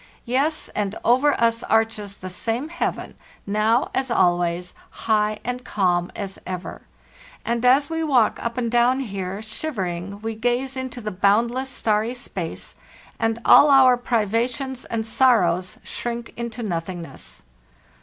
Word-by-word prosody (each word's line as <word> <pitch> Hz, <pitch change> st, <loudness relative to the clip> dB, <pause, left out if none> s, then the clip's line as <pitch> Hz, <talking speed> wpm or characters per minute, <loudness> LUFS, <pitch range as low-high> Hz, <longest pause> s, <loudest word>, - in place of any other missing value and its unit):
Yes; 275 Hz, +6 st, 0 dB
and 205 Hz, 0 st, -3 dB
over 260 Hz, +5 st, +3 dB
us 230 Hz, 0 st, +2 dB
arches 220 Hz, -3 st, 0 dB
the 185 Hz, -, -7 dB
same 230 Hz, -, -2 dB
heaven 340 Hz, -, -3 dB, 0.3 s
now 215 Hz, +4 st, +1 dB
as 265 Hz, 0 st, -1 dB
always, 175 Hz, -3 st, +1 dB, 0.3 s
high 215 Hz, -1 st, +2 dB
and 250 Hz, +1 st, -4 dB
calm 180 Hz, -6 st, 0 dB
as 195 Hz, -2 st, -6 dB
ever; 185 Hz, -1 st, -6 dB, 0.6 s
and 235 Hz, 0 st, -1 dB
as 265 Hz, +3 st, +5 dB
we 325 Hz, 0 st, -2 dB
walk 255 Hz, -8 st, +2 dB
up 235 Hz, +1 st, -3 dB
and 235 Hz, -2 st, -1 dB
down 245 Hz, +3 st, +3 dB
here 195 Hz, -3 st, -5 dB
shivering 200 Hz, -, -4 dB
we 225 Hz, 0 st, -3 dB
gaze 245 Hz, +4 st, -1 dB
into 260 Hz, -2 st, -5 dB
the 215 Hz, -1 st, -4 dB
boundless 230 Hz, +7 st, +2 dB
starry 220 Hz, -1 st, 0 dB
space, 185 Hz, -9 st, -5 dB, 0.4 s
and 225 Hz, 0 st, +1 dB
all 290 Hz, -, +8 dB
our 265 Hz, -2 st, +7 dB
privations 245 Hz, +3 st, -1 dB
and 225 Hz, -1 st, -3 dB
sorrows 210 Hz, -8 st, +2 dB
shrink 235 Hz, -1 st, -5 dB
into 235 Hz, 0 st, -5 dB
nothingness. 170 Hz, -3 st, -5 dB
230 Hz, 135 wpm, -23 LUFS, 200-250 Hz, 0.6 s, all